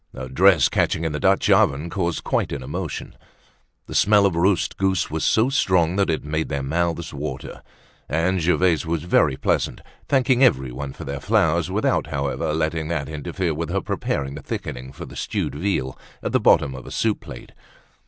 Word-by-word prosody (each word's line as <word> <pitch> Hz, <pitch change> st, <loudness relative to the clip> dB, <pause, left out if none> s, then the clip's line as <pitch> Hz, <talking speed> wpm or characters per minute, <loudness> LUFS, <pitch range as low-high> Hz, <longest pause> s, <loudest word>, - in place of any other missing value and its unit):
A 65 Hz, -, -6 dB
dress 85 Hz, +2 st, +5 dB
catching 80 Hz, -, 0 dB
in 80 Hz, -, -1 dB
the 75 Hz, -, -3 dB
Dutch -, -, +2 dB
oven 70 Hz, +4 st, +3 dB
caused 85 Hz, -4 st, -2 dB
quite -, -, 0 dB
an 70 Hz, -2 st, -4 dB
emotion. -, -, -5 dB, 0.7 s
The -, -, -9 dB
smell 105 Hz, 0 st, +4 dB
of 95 Hz, -4 st, +1 dB
roast 90 Hz, +2 st, +1 dB
goose 95 Hz, 0 st, 0 dB
was 80 Hz, 0 st, -2 dB
so 110 Hz, +4 st, +3 dB
strong 95 Hz, -, +2 dB
that 100 Hz, -2 st, +2 dB
it 80 Hz, -, -1 dB
made 80 Hz, +2 st, -2 dB
their 70 Hz, -2 st, -2 dB
mouths 85 Hz, +3 st, -1 dB
water. 70 Hz, -2 st, -6 dB, 0.5 s
And 85 Hz, +5 st, +1 dB
Gervaise 90 Hz, -1 st, +2 dB
was 80 Hz, -1 st, -2 dB
very 75 Hz, -5 st, +2 dB
pleasant, -, -, 0 dB, 0.3 s
thanking 130 Hz, -1 st, +3 dB
everyone 65 Hz, -, +1 dB
for -, -, -9 dB
their 70 Hz, 0 st, -5 dB
flowers 85 Hz, -4 st, +2 dB
without -, -, 0 dB
however 70 Hz, +2 st, -2 dB
letting 80 Hz, 0 st, -1 dB
that 75 Hz, -5 st, -2 dB
interfere 80 Hz, +3 st, -3 dB
with 80 Hz, +1 st, -4 dB
her -, -, 0 dB
preparing 70 Hz, -1 st, -2 dB
the 70 Hz, -, -7 dB
thickening 65 Hz, -1 st, -6 dB
for 70 Hz, -, -9 dB
the -, -, -12 dB
stewed -, -, -2 dB
veal 75 Hz, -6 st, -2 dB, 0.3 s
at -, -, -2 dB
the -, -, +3 dB
bottom 70 Hz, -, +4 dB
of 65 Hz, -, -9 dB
a -, -, -8 dB
soup 110 Hz, -2 st, 0 dB
plate. -, -, -11 dB
80 Hz, 185 wpm, -22 LUFS, 70-95 Hz, 0.7 s, dress